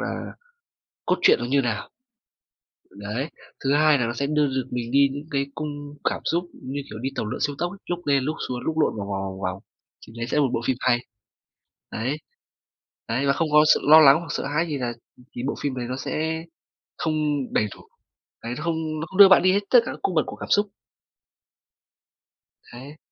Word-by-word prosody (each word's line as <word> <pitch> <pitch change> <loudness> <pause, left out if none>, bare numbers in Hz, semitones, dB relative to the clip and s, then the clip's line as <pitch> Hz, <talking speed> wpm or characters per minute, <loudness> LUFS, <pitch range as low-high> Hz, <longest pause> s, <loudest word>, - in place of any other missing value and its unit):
là - - -4 0.7
cốt - - +2
truyện - - +6
nó - - -2
như 140 +2 +2
nào. 115 -5 -3 1.1
Đấy, 110 +9 -4 0.3
thứ 135 +1 +2
hai 150 0 +5
là 120 - 0
nó 120 - -2
sẽ 140 +3 -2
đưa 150 0 +2
được 130 -1 -2
mình 120 -1 -3
đi 140 0 +5
những 145 +2 -6
cái 140 -1 0
cung 145 -1 -6
cảm - - -4
xúc 170 +2 +1 0.2
như 140 +2 -4
kiểu 110 - -8
đi 135 - -1
tàu - - -2
lượn 105 - -4
siêu 145 -1 0
tốc 175 0 -2
ấy, 200 - -13
lúc 175 0 -3
lên 140 -2 +2
lúc 155 +3 -2
xuống, 125 -1 -3
lúc 160 +3 -2
lộn - - +2
vòng 100 -1 -4
vòng, 95 -1 -3
vòng 95 0 -6
vòng. 95 +1 -4 0.4
Thì 110 - -13
đấy 120 0 -3
sẽ - - -1
là - - +5
một 130 - +1
bộ 115 - 0
phim 130 -2 0
hay. 120 -2 +3 1.0
Đấy. 130 +7 -2 0.9
Đấy, 125 +5 0
và 140 - +4
không 160 +2 -1
có 150 0 +7
sự - - -2
lo 155 +1 +10
lắng 140 -2 +8
hoặc 170 - -9
sợ - - -2
hãi 150 +4 0
gì 145 -2 -2
là, 120 -2 -2 0.2
ừm, 125 - -19
thì 120 - -4
bộ - - -1
phim 140 -2 -1
đấy 120 -1 -3
nó 130 - -3
sẽ 160 +4 -3 0.5
không 155 -1 -1 0.4
đầy 105 - +2
đủ. - - -17 0.6
Đấy, 120 +1 -3
nó 155 - -6
không 160 -2 -2
nó 160 - -4
không 190 +3 -8
đưa 200 -1 +11
bạn 190 - +6
đi 185 0 +4
hết 200 - +3
tất 245 - +8
cả - - -3
các - - -9
cung 185 - -1
bậc 155 - +2
của - - -7
cảm - - -8
xúc. 205 +1 +4 2.1
Đấy. 135 +5 -10
140 Hz, 230 wpm, -24 LUFS, 125-155 Hz, 2.1 s, đưa